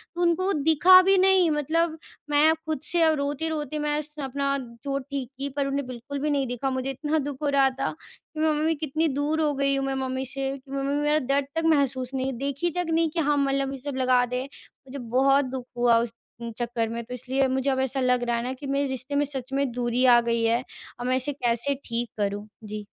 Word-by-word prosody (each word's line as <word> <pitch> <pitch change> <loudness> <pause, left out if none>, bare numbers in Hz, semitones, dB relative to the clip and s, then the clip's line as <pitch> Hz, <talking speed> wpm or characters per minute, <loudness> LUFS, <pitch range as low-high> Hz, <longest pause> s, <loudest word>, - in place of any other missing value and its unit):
तो 350 - -3
उनको 345 +1 +2
वो 395 - +1 0.2
दिखा 365 +4 +8
भी 385 +1 +4
नहीं। 375 -2 +5
मतलब 315 +2 0 0.3
मैं 300 +2 +5
खुद 310 -4 -3
से 345 -2 0
अब 320 -1 +4
रोते-रोते 300 +1 -2
मैं 295 0 0
स 300 0 -13
अपना 275 +1 -1 0.3
चोट 275 -1 -2
ठीक 270 -3 -3
की 275 +1 -3
पर 280 +1 -3
उन्होंने 280 +1 -1
बिल्कुल 255 +3 -6
भी 300 +2 -1
नहीं 280 -2 +1
दिखा। 245 +2 -2
मुझे 260 0 -2
इतना 300 +4 -1
दुःख 285 -1 -4
हो 290 - +1
रहा 275 -1 +4
था 270 +1 -3 0.4
कि 310 - -7
मैं 315 0 +3
मम्मी 310 +1 +1
कितनी 310 +1 -1
दूर 295 +3 0
हो 295 -2 +1
गई 275 0 +1
हूँ 270 0 -1
मैं 270 - -1
मम्मी 260 0 -2
से, 270 +1 -3
कि 270 0 -17
मम्मी 275 +1 -1
मेरा 300 +1 +2
दर्द 275 0 0
तक 325 - 0
महसूस 270 -5 +1
नहीं 265 0 -1
देखी 280 +6 -2
तक 355 - 0
नहीं 325 0 +2
कि 330 - -3
हाँ, 295 -2 +2
मलहम 275 -1 +1
ये - - -5
सब 285 +1 -5
लगा 255 -1 +3
दें। 250 +1 -3
मुझे 275 -1 -13
बहुत 265 +4 +3
दुःख 255 -1 -5
हुआ 240 -1 +4
उस 230 -1 -3 0.4
चक्कर 235 -2 -2
में 235 +1 -4
तो 250 - -9
इसलिए 260 +2 0
मुझे 265 +1 0
अब 265 -1 +1
ऐसा 265 +1 -1
लग 250 -1 +2
रहा 240 -1 0
है 235 - -2
ना 255 +1 -2
कि 275 +2 -8
मेरे 275 +1 0
रिश्ते 265 +2 -4
में 290 +1 +2
सच 265 -2 -5
में 275 -1 +1
दूरी 245 +1 0
आ 240 -1 +7
गई 235 -1 0
है। 230 +2 +2 0.4
अब 245 - -4
मैं 255 - +2
इसे 260 +3 -1
कैसे 245 +1 0
ठीक 235 0 -2
करूँ? 205 0 -2 0.2
जी। 210 0 -6
275 Hz, 240 wpm, -25 LUFS, 255-295 Hz, 0.4 s, दिखा